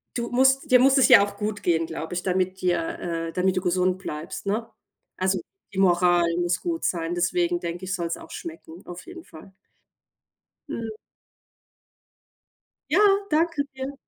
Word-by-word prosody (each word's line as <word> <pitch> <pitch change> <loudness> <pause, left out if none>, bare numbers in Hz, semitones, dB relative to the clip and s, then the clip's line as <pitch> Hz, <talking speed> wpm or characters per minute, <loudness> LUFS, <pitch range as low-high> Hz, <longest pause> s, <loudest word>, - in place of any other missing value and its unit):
du 235 -1 -2
musst 265 +2 +3
dir 250 - +7
muss 270 +2 +5
es 270 - +6
ja 235 -5 +8
auch 205 - -10
gut 210 0 -4
gehen, 165 -2 +2
glaube 160 +1 -6
ich, 180 - -3
damit 185 0 -1
dir, 175 -2 -1
äh 165 -1 -3
damit 185 +1 +1
du - - +1
gesund 180 0 +1
bleibst, 155 +1 -6
ne? 215 +3 -2 0.5
Also, 190 0 0 0.3
die 190 - -3
Moral 175 -2 +4
muss 175 0 0
gut 335 -1 -3
sein, 170 -1 -1
deswegen 345 - +1
denke 175 - -5
ich, 185 - -3
soll's 170 -2 -3
auch - - -13
schmecken, 165 +1 -9
auf 175 0 -9
jeden 350 -1 -10
Fall. 160 +4 -14 1.2
Mhm. 225 -1 -4 2.0
Ja, - - +4 0.3
danke 315 -1 +1
dir. 265 +1 -5
185 Hz, 160 wpm, -25 LUFS, 175-245 Hz, 2.0 s, ja